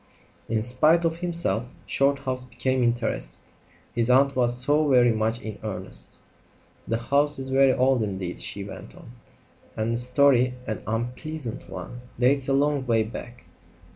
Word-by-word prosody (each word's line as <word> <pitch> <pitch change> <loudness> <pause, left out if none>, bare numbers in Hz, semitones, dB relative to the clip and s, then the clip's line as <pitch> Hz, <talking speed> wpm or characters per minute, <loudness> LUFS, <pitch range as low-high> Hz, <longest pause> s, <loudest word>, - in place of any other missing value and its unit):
In 110 -1 +1
spite 155 +8 +3
of 165 0 0
himself 170 -9 0 0.2
Shorthouse 135 -2 0
became 130 +1 -1
interested. 120 - -1 0.6
His 120 0 0
aunt 135 +2 +4
was 120 -1 +2
so 145 +4 +2
very 125 -3 +5
much 110 +1 0
in 105 -2 -6
earnest. 95 -3 -6 0.7
"The 115 - 0
house 140 +5 +2
is 135 0 -4
very 135 0 +5
old 130 -1 +2
indeed," 95 -4 -3
she 100 - -4
went 100 - -10
on, 120 - -13 0.7
"and 110 +1 0
the 115 - -1
story 125 0 +3
an 110 - -4
unpleasant 125 +3 -4
one 120 0 -8 0.2
dates 130 +2 +2
a 135 - +2
long 145 0 +2
way 115 -2 +3
back. 120 +2 -9
125 Hz, 150 wpm, -25 LUFS, 115-140 Hz, 0.7 s, very